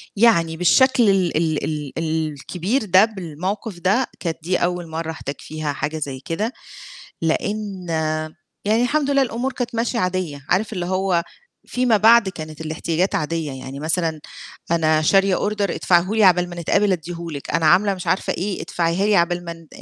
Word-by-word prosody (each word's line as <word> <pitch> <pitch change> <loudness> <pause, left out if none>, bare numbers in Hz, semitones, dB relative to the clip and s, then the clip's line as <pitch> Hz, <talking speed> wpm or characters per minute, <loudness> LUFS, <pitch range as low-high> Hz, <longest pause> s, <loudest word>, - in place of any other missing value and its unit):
يعني 170 -7 +3
بالشكل 240 +5 +4
ال 185 -5 +2
ال 160 -2 0
ال 150 -3 -4
ال 160 -1 -1
الكبير 185 - -2
ده 190 +2 +6
بالموقف 190 +1 -5
ده، 205 +8 +2
كانت 165 -2 -3
دي 180 +2 +1
أول 175 -1 -1
مَرّة 160 0 -4
أحتاج 145 -3 -6
فيها 155 -2 -4
حاجة 150 +3 -3
زي 135 -3 -4
كده، 205 - -3 0.7
لأن 195 +2 -2 0.8
يعني 220 +3 +2
الحمد 285 +2 +1
لله 275 -1 +4
الأمور 255 +2 -2
كانت 245 -2 -4
ماشية 235 +1 -1
عادية، 180 -7 -2
عارف 210 +5 +1
اللي 180 -3 -3
هو 185 -2 +1 0.4
فيما 250 -3 +2
بعد 225 0 +6
كانت 155 -4 -8
الاحتياجات 160 +3 -1
عادية، 155 -1 -2
يعني 135 +1 -8
مثلًا 160 -1 -1 0.5
أنا 155 -2 +3
شارية 195 +3 +4
أوردر 205 -2 -1
ادفعه 175 +2 +2
لي، 220 -2 +4
عقبال 180 -1 +4
ما 175 - -8
نتقابل 200 +4 +2
ادّيه 170 0 -4
لِك، 140 -2 -6
أنا 165 0 +1
عاملة 195 +5 +4
مش 180 - -8
عارفة 185 - +1
إيه 195 +2 -3
ادفعيها 170 +3 0
لي 210 -2 +4
عبال 175 +1 +1
ما 170 - -5
ن 165 -1 -14
180 Hz, 175 wpm, -21 LUFS, 160-205 Hz, 0.8 s, ده